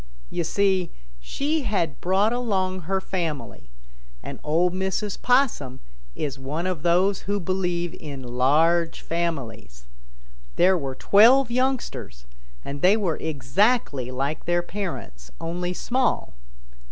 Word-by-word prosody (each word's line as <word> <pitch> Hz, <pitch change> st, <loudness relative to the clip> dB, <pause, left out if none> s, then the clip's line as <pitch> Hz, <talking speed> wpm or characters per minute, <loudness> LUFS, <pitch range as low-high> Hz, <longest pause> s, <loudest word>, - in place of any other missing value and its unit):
You 170 Hz, -, -1 dB
see, 190 Hz, +1 st, +1 dB, 0.3 s
she 290 Hz, -, -1 dB
had 200 Hz, -, -1 dB
brought 195 Hz, +5 st, +2 dB
along 190 Hz, -6 st, -1 dB
her 195 Hz, 0 st, +2 dB
family, 160 Hz, -, -4 dB, 0.5 s
and -, -, -7 dB
Ol' 165 Hz, +4 st, +2 dB
Mrs. 190 Hz, +2 st, -2 dB
Possum 245 Hz, -, +1 dB, 0.4 s
is 140 Hz, -2 st, -4 dB
one 150 Hz, +6 st, -3 dB
of 185 Hz, -5 st, -2 dB
those 180 Hz, +4 st, +3 dB
who 205 Hz, 0 st, +1 dB
believe 175 Hz, -2 st, -1 dB
in 140 Hz, -4 st, -7 dB
large 155 Hz, +7 st, +2 dB
families. 120 Hz, -, -4 dB, 0.7 s
There 185 Hz, +1 st, +5 dB
were 135 Hz, -6 st, -3 dB
twelve 235 Hz, -, +5 dB
youngsters, 250 Hz, -, -2 dB, 0.4 s
and 140 Hz, 0 st, -6 dB
they 195 Hz, +4 st, +5 dB
were 185 Hz, -7 st, -1 dB
exactly 145 Hz, -, +1 dB
like 135 Hz, +4 st, -3 dB
their 175 Hz, 0 st, +1 dB
parents, 175 Hz, -, -6 dB
only 175 Hz, +2 st, -3 dB
small. 250 Hz, +8 st, -1 dB
175 Hz, 120 wpm, -24 LUFS, 145-200 Hz, 0.7 s, There